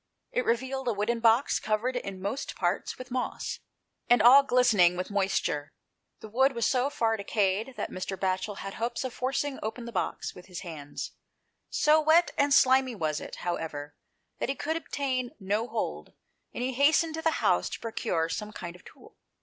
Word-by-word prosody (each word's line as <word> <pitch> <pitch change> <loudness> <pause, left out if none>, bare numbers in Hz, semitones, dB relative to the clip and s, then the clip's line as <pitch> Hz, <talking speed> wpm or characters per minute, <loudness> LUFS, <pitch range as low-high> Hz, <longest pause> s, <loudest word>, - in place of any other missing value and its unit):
It - - 0
revealed 260 +2 -1
a 235 - +2
wooden 215 +3 -1
box, 230 +3 +3
covered 220 +4 -1
in 200 -6 -4
most 265 +8 -3
parts - - -1
with 255 0 -10
moss, 255 0 -3 0.5
and 245 -1 +6
all 245 +6 +9
glistening 220 -10 +4
with 185 +3 -4
moisture. 190 -7 0 0.5
The - - -8
wood 265 +5 +3
was 235 -2 0
so 255 +1 +2
far 225 -5 0
decayed 205 +4 0
that - - -3
Mr. 185 +1 -4
Batchel 190 +2 -1
had 195 - -5
hopes 235 +3 -2
of 260 -2 -4
forcing 270 +2 -2
open 230 +2 -4
the 235 - -6
box 190 - -2
with 180 - -13
his 180 -2 -7
hands; 155 -5 -7 0.6
so 305 +1 +4
wet 320 +3 +4
and 285 0 +2
slimy 260 -2 +5
was 155 -5 -1
it, - - -7
however, 150 -4 -4 0.4
that - - -2
he 275 - 0
could 315 +4 -2
obtain 270 -4 -2
no 205 +4 -1
hold, 225 -1 -4 0.4
and 245 - -4
he 260 +1 -1
hastened 310 +5 +3
to 320 - -4
the 320 0 +2
house - - +2
to - - -6
procure 170 -7 -1
some 210 +6 -4
kind 175 -4 -7
of 180 - -16
tool. - - -17
235 Hz, 185 wpm, -28 LUFS, 195-265 Hz, 0.6 s, all